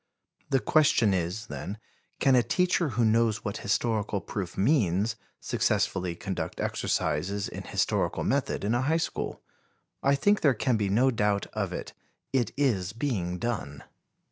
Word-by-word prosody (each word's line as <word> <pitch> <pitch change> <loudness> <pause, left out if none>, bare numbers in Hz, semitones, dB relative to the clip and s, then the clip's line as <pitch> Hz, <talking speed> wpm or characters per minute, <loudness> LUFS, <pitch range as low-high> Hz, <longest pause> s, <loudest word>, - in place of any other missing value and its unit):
The 135 - +3
question 125 -9 +3
is, 90 +5 -2
then, 105 -2 -6 0.4
can 135 -2 +4
a 125 - +6
teacher 175 +6 +1
who 120 - +4
knows 110 0 +2
what 100 - -2
historical 105 -1 0
proof 95 -3 -5
means 105 - +2 0.2
successfully 90 -2 0
conduct 95 +2 -4
exercises 100 +7 -1
in - - -7
historical - - 0
method - - 0
in 105 +3 +1
a 120 - +2
high 155 +5 +2
school? 165 - -3 0.6
I 140 +1 +3
think 205 +9 +2
there 140 -5 +4
can 125 +3 +1
be 105 -2 0
no 125 +7 +3
doubt 105 -3 +1
of - - -2
it. - - -6 0.4
It 125 -3 +1
is 100 -10 +1
being 105 -8 -2
done. 90 - -4
110 Hz, 150 wpm, -28 LUFS, 100-130 Hz, 0.6 s, a